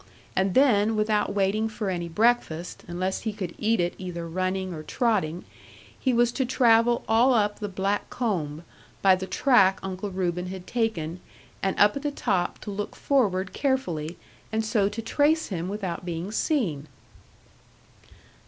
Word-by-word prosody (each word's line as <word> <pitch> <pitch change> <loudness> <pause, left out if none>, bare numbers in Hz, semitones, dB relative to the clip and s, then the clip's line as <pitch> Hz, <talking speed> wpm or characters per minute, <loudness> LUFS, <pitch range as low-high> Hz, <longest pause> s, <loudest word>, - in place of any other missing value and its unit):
And 190 0 +1
then, 225 -5 +4
without 215 -1 +1
waiting 205 +3 +1
for 215 -3 -3
any 170 -2 -3
breakfast 180 -4 0
unless 185 +2 -2
he 220 - -2
could 190 -5 -5
eat 220 0 +2
it 175 0 +1
either 175 -2 -5
running 185 +2 -2
or 155 - -6
trotting, 185 -4 0 0.5
he 260 - +1
was 240 0 +3
to 265 - 0
travel 240 -2 +3
all 240 +4 +4
up 210 -2 +1
the 205 - -3
black 195 +2 -1
combe, 170 - -2 0.4
by 190 -1 +7
the 185 +1 -5
track 195 -8 +4
Uncle 190 +1 -4
Reuben 180 -1 -2
had 185 -1 -7
taken, 185 -8 -2 0.4
and 195 - -1
up 205 0 +5
at 280 - -3
the 295 - -1
top 195 -10 -1
to 210 - -6
look 205 +1 -4
forward 195 -9 +1
carefully, 180 - -1 0.3
and 220 0 0
so 210 -2 +2
to 220 +2 -6
trace 300 +7 +2
him 180 -2 -3
without 195 -5 -4
being 175 +2 -4
seen.' 200 - 0
200 Hz, 160 wpm, -26 LUFS, 180-225 Hz, 0.5 s, by